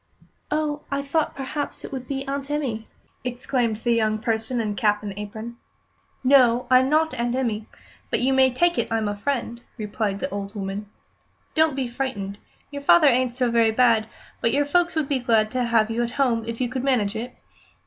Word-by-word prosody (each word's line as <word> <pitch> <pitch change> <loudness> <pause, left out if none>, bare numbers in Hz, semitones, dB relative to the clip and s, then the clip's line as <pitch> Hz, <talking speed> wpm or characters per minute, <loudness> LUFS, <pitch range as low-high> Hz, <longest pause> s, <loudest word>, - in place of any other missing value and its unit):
"Oh, 300 -1 -1
I 280 -1 -1
thought 305 +3 0
perhaps 280 +2 -4
it - - -9
would 260 -2 -6
be 270 0 -4
Aunt 275 0 -3
Emmy!" 255 -7 -2 0.4
exclaimed 245 -2 -1
the 235 +2 -1
young 215 -2 +2
person 225 +2 -1
in 210 -2 -1
cap 210 0 +1
and 205 -1 -4
apron. 220 +3 -7 0.7
"No, 255 -2 +5
I'm 255 +1 +6
not 315 +2 +2
Aunt 240 0 -1
Emmy, 225 -5 -1 0.4
but - - 0
you 265 +2 +2
may 265 0 +5
take 345 +7 +2
it - - 0
I'm 225 -1 0
a 205 - -2
friend," 235 +1 -3 0.2
replied 210 -2 -2
the 280 - -2
old 200 +1 -5
woman. 200 +1 -4 0.6
"Don't 315 -2 +3
be 265 -2 -1
frightened. 235 -6 -4 0.3
Your 285 0 -5
father 305 +3 +6
ain't 255 -2 +3
so 250 -2 +1
very 230 -1 +4
bad, 225 -1 +3 0.3
but 230 - +2
your 285 +3 +2
folks 345 +4 +2
would 310 -3 0
be 275 -2 0
glad 225 -3 +2
to 255 -1 0
have 225 -2 +2
you 230 +1 0
at 240 - 0
home 235 -5 +2
if 230 0 -4
you 250 - +1
could 255 +1 -4
manage 230 -6 +1
it. 240 +3 -5
245 Hz, 200 wpm, -24 LUFS, 220-275 Hz, 0.7 s, I'm